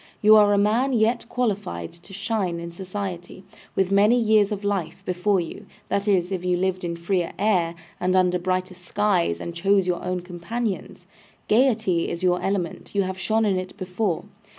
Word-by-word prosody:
You 215 +1 +7
are 210 -1 +6
a 205 - +3
man 225 +7 +2
yet 235 +1 +1
qualified 200 - -2
to 175 +3 -17
shine 195 -3 -2
in 170 0 -6
society, 185 0 -6 0.3
with 190 0 +1
many 210 +5 +5
years 215 -2 +3
of 205 -1 -3
life 190 -5 -2
before 185 +2 +1
you; 170 - -6 0.2
that 200 +1 -1
is, 185 -2 +2
if 185 -2 -2
you 180 -1 +1
lived 185 0 -1
in 170 -1 -2
freer 175 +1 -1
air, 180 -5 +1 0.2
and 185 +1 +1
under 180 -1 +3
brighter 185 +1 -1
skies, 180 - 0
and 170 - -5
chose 195 +3 +2
your 180 -1 -1
own 180 0 -2
companions. 180 +1 -4 0.4
Gaiety 220 -7 +2
is 170 - -5
your 180 -1 +2
element, 195 -1 -3
you 200 - +3
have 190 0 -4
shone 220 +3 +1
in 195 -3 +2
it 185 0 -8
before. 185 -1 -2
190 Hz, 180 wpm, -24 LUFS, 180-210 Hz, 0.4 s, You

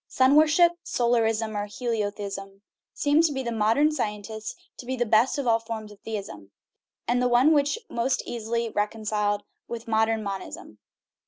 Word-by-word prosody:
Sun 260 +2 +3
worship 315 +3 +6
(solarism, 225 -4 0
or 205 0 -2
heliotheism) 205 -4 -4 0.3
seems 300 +3 +3
to 265 -2 -3
the 235 - -3
modern 230 +7 +3
scientist 215 -4 -4 0.2
to 245 - -10
be 260 - -1
the 240 -1 0
best 225 +6 +3
of 280 - -2
all 230 -1 +3
forms 225 -2 -6
of 205 - -15
theism, 195 - -7 0.6
and 245 +1 +2
the 250 - +3
one 250 +6 +5
which 290 +6 +2
may - - -15
be - - -4
most 255 +2 0
easily 235 0 -2
reconciled 210 -1 -1 0.2
with 235 -1 -7
modern 220 0 +1
monism. 190 - -7
225 Hz, 165 wpm, -26 LUFS, 210-250 Hz, 0.6 s, worship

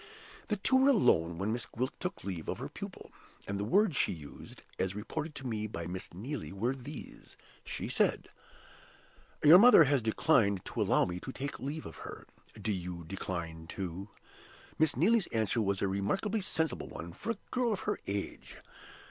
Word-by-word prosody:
The 210 - 0
two 260 +7 +3
were 265 +2 +5
alone 85 - +4
when 100 +5 -1
Miss 120 0 -3
Gwilt 130 +3 -2
took 180 - -4
leave 90 -5 -4
of - - -2
her - - -5
pupil; - - -8 0.4
and 100 0 -2
the - - 0
words 195 - +3
she - - +2
used 75 -5 -10 0.2
(as 95 +1 0
reported 150 +9 -4
to 135 - -7
me 110 -3 -2
by 85 -5 -5
Miss 90 +2 -5
Neelie) 105 - -5
were 110 +7 0
these. 135 +2 -10 0.3
She - - -4
said, - - +1 1.2
'Your 160 +4 +10
mother 240 -6 +9
has 140 -2 +2
declined 110 - +2
to - - -3
allow - - +4
me 90 0 -4
to 130 - -6
take 140 +2 -5
leave 145 +5 -4
of - - -9
her. - - -9 0.3
Do 110 - -1
you 90 -3 -4
decline 85 -2 -5
too?' 95 +2 -5 0.7
Miss 155 -2 +3
Neelie's 200 - +4
answer 110 0 0
was 100 -2 0
a - - +3
remarkably 190 - 0
sensible 160 -7 -1
one 85 0 -8
for 230 - -3
a - - -16
girl 245 -2 +1
of 205 - -1
her - - -1
age. 100 0 -4
110 Hz, 180 wpm, -32 LUFS, 95-160 Hz, 1.2 s, Your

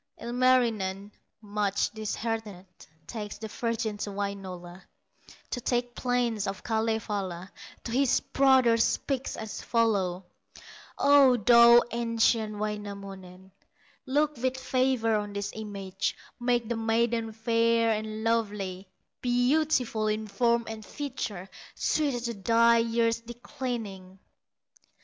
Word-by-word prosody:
Ilmarinen, 230 -5 +1 0.3
much 205 -1 -1
disheartened, 220 -3 -4 0.4
Takes 210 -3 -6
the 220 - -6
virgin 225 -1 -2
to 205 - -3
Wainola, 190 -3 -6 0.7
To - - -2
the 240 +1 +1
plains 240 -5 0
of 195 -1 -5
Kalevala, 210 -5 -2 0.3
To 230 - -5
his 265 +1 +3
brother 260 -4 +4
speaks 265 +3 -1
as 220 -1 -6
follows: 200 -6 +1 0.7
"O, 280 -3 +6
thou 235 +2 +7
ancient 230 -2 +1
Wainamoinen, 200 -3 -6 0.6
Look 295 +2 +1
with 260 +2 -1
favor 255 -3 +1
on 205 -1 -4
this 200 0 -3
image; 200 -3 -4 0.2
Make 240 -1 +1
the 235 0 -2
maiden 225 0 0
fair 230 +1 +2
and 215 0 -3
lovely, 205 -5 -1 0.3
Beautiful 245 -2 +1
in 215 +1 -1
form 235 +3 +1
and 220 -1 -7
feature, 225 -9 -5 0.3
Suited 280 -6 0
to 235 - -2
thy 230 +3 +4
years 230 0 +1
declining!" 230 -5 -6
225 Hz, 110 wpm, -28 LUFS, 205-240 Hz, 0.7 s, thou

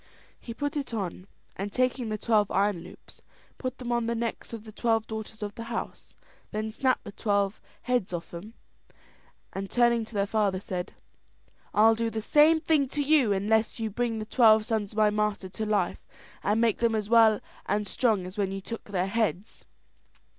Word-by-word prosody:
He 235 - -8
put 285 +5 -3
it 275 -5 -3
on, 190 -2 -4 0.3
and 200 +2 -4
taking 255 0 0
the 215 - -2
twelve 210 -2 +2
iron 200 -1 +1
loops, 175 +2 -14 0.4
put 255 -1 -4
them 245 -1 -5
on 235 -1 +1
the 235 - 0
necks 230 0 -4
of 225 -2 -7
the 220 - -11
twelve 225 0 +1
daughters 220 0 -7
of 205 0 -4
the 230 - -7
house, 230 0 -6 0.3
then 215 +1 -3
snapped 255 +3 +1
the - - -8
twelve 200 -1 0 0.2
heads 245 -7 0
off 175 -1 -5
them, 205 +7 -9 1.0
and 195 0 -4
turning 235 -1 +3
to 220 - -13
their 200 -1 +2
father, 200 -3 +1
said: 180 -2 -5 0.8
"I'll 220 +2 +6
do 230 +1 -1
the 225 - -3
same 300 +8 +5
thing 310 -3 +2
to 290 +3 -2
you 280 -6 +4
unless 215 +4 +1
you 220 -1 -2
bring 235 +1 -1
the 215 - -4
twelve 220 -2 +5
sons 215 -4 -2
of - - -12
my 215 -1 +4
master 210 -2 -1
to 215 +3 -4
life, 210 -1 -1 0.3
and 210 +2 +1
make 230 -2 +2
them 230 -1 +2
as 210 -2 -2
well 225 -2 +6 0.3
and 205 +2 0
strong 210 -2 +1
as 185 +3 -8
when 195 -1 0
you 195 - -4
took 230 +4 -7
their 190 -3 -1
heads." 205 -1 -2
220 Hz, 195 wpm, -28 LUFS, 205-235 Hz, 1.0 s, I'll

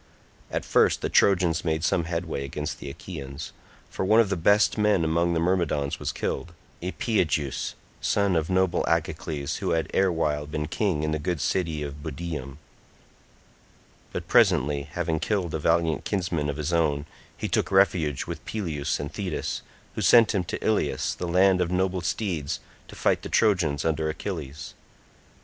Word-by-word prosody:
At - - -3
first - - +3
the - - -1
Trojans 90 -4 +3
made 80 -1 -1
some 85 0 +1
headway 85 -4 -3
against 70 - -4
the 70 - -6
Achaeans, 70 -2 -7 0.4
for - - -3
one 110 +4 +5
of 115 -4 +4
the 100 - +1
best 100 +5 +4
men 105 -4 +3
among 85 +2 +2
the - - +2
Myrmidons 85 -5 0
was - - -2
killed, 85 - -3 0.3
Epeigeus, 85 - -1 0.3
son 100 -3 +2
of 80 -1 0
noble 95 -1 +2
Agacles 70 -3 -1
who - - -1
had 80 -1 -1
erewhile 80 -6 +1
been 75 0 -3
king 85 -3 0
in 75 - 0
the 75 - -1
good 85 +1 -2
city 80 -2 -1
of 70 0 -7
Budeum; 75 -3 -5 1.5
but - - -5
presently, 70 +1 +3
having 80 -2 -1
killed 95 -5 -1
a 80 - -1
valiant 80 -1 +1
kinsman 90 -7 -1
of 70 - -3
his 75 +3 -2
own, 75 -4 +1 0.3
he - - -2
took - - 0
refuge 90 -8 +2
with - - -6
Peleus 80 -10 -2
and 70 - -5
Thetis, 95 -6 -3 0.3
who - - -4
sent 115 -2 +6
him 95 -3 +1
to - - -3
Ilius 110 -1 +1
the 90 - -5
land 90 +1 +4
of 85 - 0
noble 90 0 0
steeds 85 -4 -2 0.3
to - - -12
fight - - +1
the - - -7
Trojans 90 -10 +2
under 80 -1 0
Achilles. 80 -4 -5
85 Hz, 165 wpm, -26 LUFS, 75-95 Hz, 1.5 s, sent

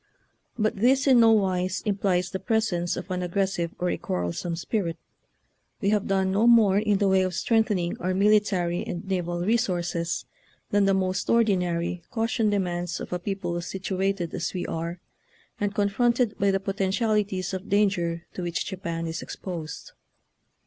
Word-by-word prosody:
But 215 -2 0
this 260 +6 +3
in 260 -3 +6
no 225 -1 +7
wise 185 -3 +1
implies 190 -3 0
the 190 - -3
presence 205 -7 0
of 185 - -6
an 180 0 -1
aggressive 180 -1 -1
or 180 0 0
a - - -3
quarrelsome 90 - -2
spirit. 170 -1 -2 0.8
We 200 - +1
have 210 -2 +1
done 190 -1 +1
no 210 +4 +3
more 215 -5 +6
in 210 -1 +2
the 200 0 +2
way 190 0 +4
of 185 -1 -1
strength 225 +3 +2
ening 175 -4 -1
our 185 +1 -1
military 195 -4 +2
and 175 +2 -5
naval 175 -2 -1
resources 175 -6 0 0.5
than 205 -1 +3
the 195 0 +3
most 185 -1 -1
ordinary 180 -6 +1
caution 225 -1 0
demands 175 -3 -1
of - - -6
a 180 - -1
people 175 -2 -3
situated 190 -1 -2
as - - -3
we 180 - -2
are 170 +2 -4 0.6
and 205 0 -1
con 205 -1 +2
fronted 240 +1 +1
by 200 - +3
the 195 0 +2
potentialities 195 -1 0
of 190 +2 -5
danger 175 -5 +1
to - - -5
which 175 -1 -2
Japan 170 -4 -4
is 165 0 -4
exposed. 165 -5 -7
190 Hz, 165 wpm, -26 LUFS, 175-205 Hz, 0.8 s, no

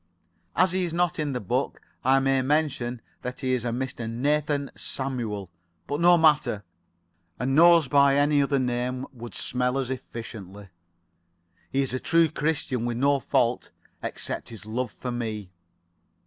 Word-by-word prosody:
"As 185 0 +4
he 185 0 +1
is 170 -2 -2
not 175 -2 +1
in 150 -2 -1
the 125 - -2
book, 100 - -1 0.2
I 135 +1 +5
may 135 0 +2
mention 130 -4 0 0.2
that 125 +2 -6
he 130 -1 0
is 125 - +1
[Pg 120 0 -2
82]a 120 - -2
Mr. 125 -3 -4
Nathan 145 +3 0
Samuel. 115 -8 -4 0.3
But 145 - -3
no 175 +1 +6
matter. 150 -10 +3 0.7
A 125 - -3
nose 165 +3 +6
by 140 0 +5
any 145 0 +4
other 140 0 +1
name 125 0 -1
would 120 -1 -9
smell 125 +1 0
as 130 -1 -2
efficiently. 105 -6 -8 1.0
He 135 +1 +1
is 130 - -3
a 130 - -1
true 165 +3 +3
Christian 150 -6 -1
with 120 -1 -2
no 140 +2 +3
fault 120 -1 +1 0.3
except - - -4
his 110 -2 -10
love 120 +3 -2
for 125 - -5
me. 110 -5 -4
130 Hz, 160 wpm, -26 LUFS, 120-145 Hz, 1.0 s, no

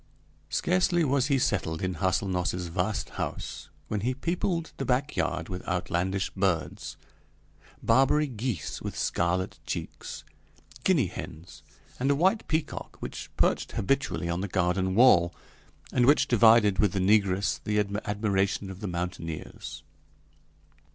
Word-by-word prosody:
Scarcely 95 - +2
was 140 -3 +2
he 140 -2 +3
settled 90 -9 0
in 90 0 0
Hâselnoss's 90 -1 -1
vast 95 +3 -1
house - - -5 0.2
when 105 -2 -2
he 125 +4 0
peopled 170 +2 -1
the - - -2
back 135 +3 0
yard - - -1
with 90 -1 -5
outlandish 90 +2 -1
birds 95 -4 -1 0.9
Barbary 140 +3 +4
geese 115 - -4
with - - -5
scarlet 90 +2 0
cheeks, - - -5 0.6
Guinea 170 - +4
hens, 85 -1 -8 0.4
and 135 +2 +1
a 140 - +4
white 190 +8 +2
peacock, 155 -1 -3
which - - -6
perched - - +1
habitually 120 -5 0
on 85 +1 -1
the 100 - -2
garden 95 0 0
wall, 95 -8 +6 0.6
and 125 -1 +3
which 140 0 +5
divided 110 -4 +5
with 105 -4 +3
the 100 - 0
negress 100 0 +2
the 105 0 0 0.3
admiration 100 -1 0
of 95 - -9
the 105 - -4
mountaineers. 80 -4 -5
100 Hz, 130 wpm, -28 LUFS, 90-130 Hz, 0.9 s, wall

